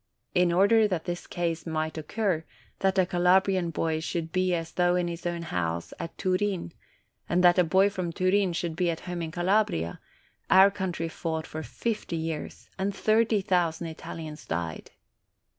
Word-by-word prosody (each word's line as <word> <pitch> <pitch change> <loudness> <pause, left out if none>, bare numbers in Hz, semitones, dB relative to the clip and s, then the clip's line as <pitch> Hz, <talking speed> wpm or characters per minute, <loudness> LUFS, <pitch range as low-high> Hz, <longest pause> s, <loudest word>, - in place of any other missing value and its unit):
In 180 -1 +3
order 205 +5 +5
that 180 -5 -2
this 175 -1 -4
case 170 -1 -2
might 155 0 -2
occur, 165 +1 -1 0.4
that 195 0 +1
a 185 - +5
Calabrian 180 0 +3
boy 160 0 -1
should 165 0 -3
be 185 +1 +1
as 165 -1 -4
though 175 0 +2
in 180 -1 +1
his 170 0 -4
own 170 -1 -3
house 85 - -3
at 165 - -6
Turin, 185 -1 0 0.6
and 180 +1 +2
that 175 +1 +6
a - - +6
boy 190 +4 +4
from 185 -4 -3
Turin 185 +1 +2
should 170 -1 -2
be 175 0 +1
at 165 - -3
home 175 -1 -5
in 165 - -3
Calabria, 175 - 0 0.5
our 190 +1 +7
country 185 -4 -3
fought 160 -1 -3
for 155 - -6
fifty 215 +1 -3
years, 160 -1 -5
and 195 +1 -1
thirty 220 -1 +2
thousand 175 -4 0
Italians 155 -1 -8
died. 85 -2 -4
175 Hz, 170 wpm, -27 LUFS, 165-190 Hz, 0.6 s, our